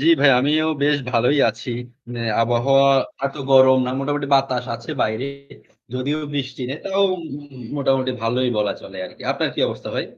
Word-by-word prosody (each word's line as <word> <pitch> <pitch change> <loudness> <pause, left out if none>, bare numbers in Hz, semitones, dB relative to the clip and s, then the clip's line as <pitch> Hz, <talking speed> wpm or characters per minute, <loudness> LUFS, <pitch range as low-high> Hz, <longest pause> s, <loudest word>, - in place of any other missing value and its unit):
জ্বি, 150 - 0
ভাই 145 -1 +6
আমিও 155 +3 +2 0.2
বেশ 145 0 +3
ভালোই 125 +4 +2
আছি। 115 +3 -5 0.7
আবহাওয়া 135 +4 +3 0.4
এত 140 - -7 0.2
গরম 130 -1 +7
না। 125 - -2
আর 130 - -3
মোটামুটি 145 +1 -2
বাতাস 130 -2 +1
আছে 115 +4 -8
বাইরে। 110 +5 -1 0.7
যদিও 135 +4 -1 0.2
বৃষ্টি 135 -1 -4
নেই 140 +4 -4
তাও 195 0 +1 0.7
মোটামুটি 135 -2 +1
ভালোই 125 +3 +1
বলা 105 -1 +1
চলে 95 - -11
আরকি। - - -14
আপনার - - -1
কি - - -3
অবস্থা - - -7
ভাই? - - -1
135 Hz, 165 wpm, -21 LUFS, 125-140 Hz, 0.7 s, গরম